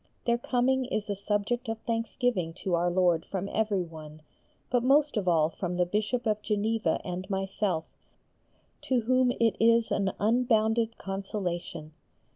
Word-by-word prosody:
Their 235 0 +2
coming 255 +2 +1
is 215 -4 -2
a - - -1
subject 210 +5 -1
of 225 - -2
thanksgiving 230 -6 -1
to 185 +1 -4
Our 175 +1 +2
Lord 175 -2 +2
from 195 0 -4
everyone, 165 -8 -3 0.5
but 245 -1 +3
most 285 +3 +3
of 205 -4 -1
all 160 -3 +4
from 180 +1 -4
the 180 - +3
Bishop 215 +6 -1
of 215 -1 0
Geneva 215 +1 0
and 185 +2 -5
myself, 195 -3 -1 1.0
to 255 -2 +1
whom 255 +2 +3
it 230 -2 +3
is 230 0 +4
an 195 -1 +1
unbounded 225 0 +2
consolation. 180 -5 -4
210 Hz, 145 wpm, -28 LUFS, 180-235 Hz, 1.0 s, all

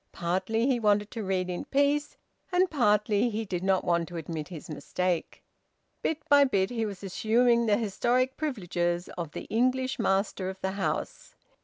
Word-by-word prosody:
Partly 190 +6 0
he 260 -2 +2
wanted 210 -1 +2
to 225 -3 -4
read 185 -1 -1
in 180 -1 -4
peace, 285 +1 +1 0.3
and 365 +1 +3
partly 210 -4 +2
he 220 0 -3
did 180 -3 -3
not 190 -1 +2
want 170 -1 +1
to 175 - -7
admit 160 -1 -5
his 170 -4 -9
mistake. 175 +2 -3 0.6
Bit 315 0 -2
by 285 -1 +7
bit 200 -7 +1
he 225 -2 -1
was 200 -1 -8
assuming 235 +4 +2
the 205 -1 +4
historic 240 +4 0
privileges 175 - -2
of 165 -4 -6
the - - -5
English 255 +3 0
master 195 -1 0
of 190 0 -7
the 190 - -1
house. 195 0 -3
205 Hz, 170 wpm, -28 LUFS, 185-245 Hz, 0.6 s, by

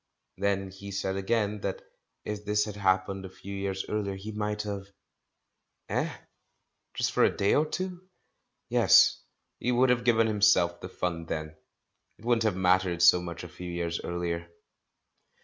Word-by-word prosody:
Then 100 -1 0
he 100 +1 -10
said 95 -1 -2
again 105 +1 0
that 95 - -3 0.4
if 105 0 -4
this 105 0 +1
had 105 - -6
haiipened 95 -1 0
a 95 - -7
few 100 +1 -9
years 95 -1 -3
earher, 100 -2 -2
he 105 +3 -7
might 105 0 -2
have 100 -2 -5 0.5
— - - -46
Eh? - - 0 0.8
Just - - 0
for - - +3
a - - +6
day 100 - +1
or 155 +1 +3
two? 180 +2 -4 0.7
Yes, - - +5 0.4
he 125 - 0
would 125 +1 +4
have 120 -1 +1
given 115 -2 +4
him 105 -2 -2
self 90 -4 +4
the 90 - -7
fun 85 -3 -3
then! 80 -1 -4 0.6
It 110 - -16
wouldn't 120 -2 +2
have 105 -4 +2
mattered 90 -2 +2
so 90 +1 +7
much 85 -1 -6
a - - -6
few 90 +1 -8
years 85 -1 -2
earlier. 85 -1 -3
100 Hz, 170 wpm, -28 LUFS, 90-105 Hz, 0.8 s, so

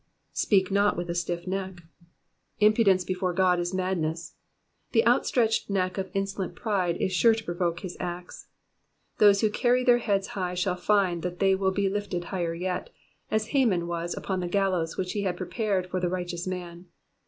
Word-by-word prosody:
"Speak 190 -3 +2
not 200 -1 +3
with 175 0 -3
a - - -2
stiff 175 0 -3
neck." 190 -1 -4 0.8
Impudence 210 -3 +4
before 180 0 -2
God 180 -1 +3
is 175 0 -2
madness. 175 -3 -2 0.6
The 225 -2 +4
out 240 +2 +3
stretched 225 -4 +1
neck 185 -1 0
of 190 -1 -3
insolent 195 -1 -2
pride 185 -6 0
is 185 - -1
sure 225 +4 +5
to 225 - -6
provoke 175 -1 -2
his 185 -3 -7
axe. 175 0 -6 0.7
Those 200 -1 +6
who 215 - +2
carry 245 +3 +2
their 245 -1 +5
heads 200 -4 0
high 180 -2 -3
shall 180 0 0
find 180 -2 +1
that 175 0 -4
they 195 +1 +3
will 190 0 +1
be 195 +1 0
lifted 195 -3 -2
yet - - -11
higher, 180 0 -2 0.4
'as 215 0 0
Haman 225 -11 +2
was 170 0 -3
upon 190 -1 -2
the 180 - -2
gallows 185 -3 0
which 185 -1 -2
he 205 - -2
had 185 -3 -1
prepared 195 0 -1
for 185 0 -3
the 180 -1 0
righteous 175 -1 -4
man. 180 -1 -6
185 Hz, 185 wpm, -27 LUFS, 175-200 Hz, 0.8 s, Those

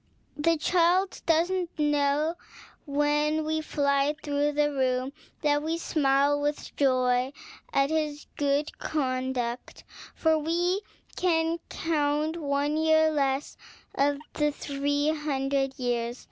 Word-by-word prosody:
The 330 +3 +2
child 360 +4 +2
does 330 +2 +3
not 370 -2 -1
know, 295 +1 +1 0.5
when 295 +2 +1
we 315 0 0
fly 280 -1 +1
through 290 0 0
the 295 0 +2
room, 260 -1 0 0.3
that 290 -1 +3
we 320 +2 -1
smile 290 -2 +2
with 290 0 -3
joy 255 -1 +2 0.4
at 275 +2 +2
his 305 -2 -1
good 285 +1 0
conduct, 255 -4 -2 0.3
for 320 -1 +2
we 350 +5 0 0.3
can 330 -2 +1
count 305 0 0
one 290 -1 0
year 315 0 +4
less 275 -2 -1 0.4
of 285 +1 +2 0.2
our 295 0 +3
three 285 0 -1
hundred 275 -3 -1
years. 240 -1 -2
295 Hz, 120 wpm, -27 LUFS, 275-315 Hz, 0.5 s, year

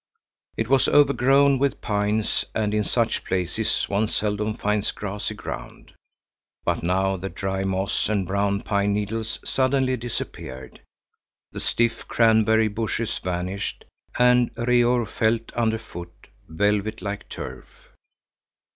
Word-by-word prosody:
It 115 - 0
was 135 +1 +4
overgrown 140 -1 +4
with 140 0 +1
pines, 105 0 0
and 105 -1 0
in 105 0 +2
such 115 +1 0
places 90 -2 -1
one 100 +2 0
seldom 105 0 -1
finds 105 0 0
grassy 105 0 -4
ground. - - -8 0.7
But - - 0
now 95 +2 +1
the 95 +2 -5
dry 95 0 -2
moss 95 +1 0
and 100 -3 +1
brown 100 +1 0
pine 100 0 +1
needles 110 +2 -2
suddenly 130 -1 +1
disappeared, 65 - -6 0.7
the - - -6
stiff 115 0 0
cranberry 110 -1 +4
bushes 110 +1 -2
vanished, 90 +2 -3 0.3
and 125 0 +5
Reor 120 0 +3
felt 115 +2 0
under 110 -2 +1
foot 90 -6 -9 0.4
velvet 105 +5 0
like 100 0 -5
turf. - - -7
105 Hz, 120 wpm, -24 LUFS, 100-115 Hz, 0.7 s, and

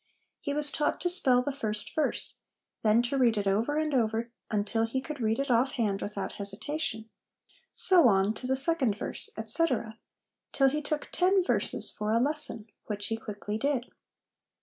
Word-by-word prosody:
He 285 - -3
was 295 -1 +3
taught 295 - 0
to 355 - +2
spell 255 -9 +4
the 285 - -2
first 215 -6 -2
verse, 310 - -1 0.4
then 220 +2 +4
to 270 +3 -1
read 235 -4 +3
it 205 - -1
over 220 +10 +1
and 310 -1 0
over 230 -1 0 0.2
until 215 +1 0
he 260 +4 -2
could 290 0 -7
read 220 0 +1
it 275 -1 -1
off 245 +3 +2
hand 205 -5 -1
without 205 -1 -4
hesitation; 220 +3 -2 0.7
so 355 -8 +5
on, 195 -1 +3
to 250 - -6
the 265 - +2
second 270 -6 +1
verse, - - -3
etc., 225 0 -1 0.5
till 270 -1 +4
he 300 +3 -2
took 300 0 -3
ten 375 +1 +3
verses - - +1
for 210 +1 -2
a 230 - +3
lesson, 280 -5 -1 0.2
which 205 -1 -4
he 225 - 0
quickly 210 -1 -5
did. 265 -1 -1
240 Hz, 175 wpm, -29 LUFS, 215-290 Hz, 0.7 s, so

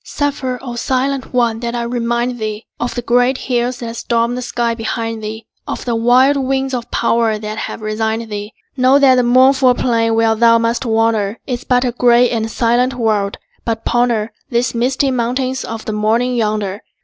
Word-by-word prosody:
Suffer, 275 -3 -2
O 245 -3 -5
silent 260 +2 -1
one, 235 -3 +1
that 235 0 -3
I 240 - -2
remind 235 +1 -1
thee 215 0 -4
Of 240 - -3
the 245 - -3
great 245 +2 +2
hills 245 -1 -1
that 230 -1 -5
stormed 235 +1 0
the 250 - -4
sky 240 -1 -1
behind 225 0 -4
thee, 220 +1 -6 0.2
Of - - -5
the 240 -2 0
wild 250 +5 +4
winds 270 0 -1
of 240 -2 -4
power 230 -2 +1
that 215 0 -6
have - - -5
resigned 220 +1 -2
thee. 205 +1 -5 0.2
Know 260 +1 +4
that 275 -2 +5
the 255 - +4
mournful 255 +1 +4
plain 230 -2 +1
where 225 0 +3
thou 230 +1 +5
must 230 +2 -1
wander 225 -2 +1
Is 250 -1 -4
but 250 0 +2
a 245 - 0
gray 245 0 +4
and 225 -2 -1
silent 245 +3 +1
world, 215 -4 0 0.3
but 225 -1 -3
ponder 235 -2 +1 0.2
The 240 +1 0
misty 260 +3 +1
mountains 255 +2 -1
of 225 -1 -6
the 215 - -3
morning 225 +4 +1
yonder. 210 -3 -1
235 Hz, 185 wpm, -17 LUFS, 225-250 Hz, 0.3 s, that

